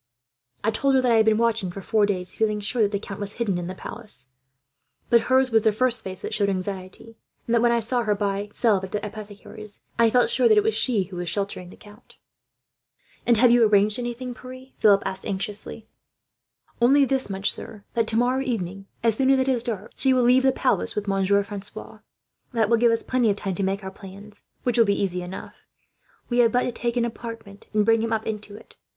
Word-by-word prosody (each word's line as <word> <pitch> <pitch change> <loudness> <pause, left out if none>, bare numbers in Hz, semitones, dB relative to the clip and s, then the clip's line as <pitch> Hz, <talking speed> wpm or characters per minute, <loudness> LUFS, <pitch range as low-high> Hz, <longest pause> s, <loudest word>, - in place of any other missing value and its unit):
"I 220 - +2
told 270 +5 +1
her 260 - +4
that 250 -1 +2
I 230 - +5
had 220 0 +3
been 215 -1 +4
watching 225 -4 +1
for 175 - -7
four 215 0 +2
days, 185 -3 -3
feeling 215 -1 0
sure 215 +4 -1
that 205 -1 +2
the 200 - 0
count 195 -1 -8
was 205 0 -5
hidden 205 -7 -1
in 175 - -5
the 185 - -6
palace; 185 - -2 0.8
but 235 -1 +6
hers 260 0 +3
was 225 -1 +4
the 220 - +3
first 245 +1 0
face 185 -1 -8
that - - -4
showed 200 -1 +1
anxiety, 190 +3 -5 0.3
and 235 - -2
that, 235 - +4
when 240 0 +4
I 235 0 +2
saw 240 +2 -1
her 210 -3 0
buying 200 0 -2
salve 210 -5 +1
at 190 - -7
the 210 - -2
apothecary's, 210 0 -10 0.2
I 230 -1 +5
felt 250 - +2
sure 480 - +3
that 435 - +5
it 420 - +5
was 440 +1 +1
she 230 -7 0
who 185 0 -10
was 175 -1 -3
sheltering 195 -1 -4
the - - -14
count." 210 +3 -17 1.1
"And 235 -2 +5
have 240 +2 +5
you 240 -1 +5
arranged 210 +1 +3
anything, 245 +1 -5
Pierre?" 255 +1 -11
Philip 200 -2 +5
asked 190 - -4
anxiously. 205 +2 -3 0.9
"Only 275 +4 +5
this 265 -3 -1
much, 195 0 0
sir, 210 -2 -8
that 230 -1 0
tomorrow 245 +4 +1
evening, 195 -7 -4 0.2
as 225 -2 +2
soon 265 0 +2
as 270 - +5
it 260 0 0
is 255 -3 +2
dark, 220 -4 -5
she 265 0 +3
will 250 - +3
leave 250 +2 +5
the 265 0 +3
palace 260 - 0
with 210 0 -3
Monsieur 195 +1 +2
Francois. 205 0 -8 0.5
That 225 -2 +1
will 230 - +5
give 235 0 +4
us 230 - 0
plenty 250 -3 +1
of 200 - +1
time 195 -1 -4
to 180 - -4
make 195 +1 -1
our 190 - -6
plans, 200 +2 -12 0.2
which 245 -1 +1
will 230 - +6
be 200 -1 +1
easy 180 -2 -1
enough. 180 +1 -9 0.6
We 245 0 0
have 230 -2 +5
but 250 +2 +2
to - - -2
take 240 0 -3
an 235 - +2
apartment, 230 -3 -8
and 210 -1 +2
bring 225 0 +3
him 230 0 -2
up 220 -1 -1
into 210 -2 -5
it. - - -15
220 Hz, 230 wpm, -24 LUFS, 200-240 Hz, 1.1 s, but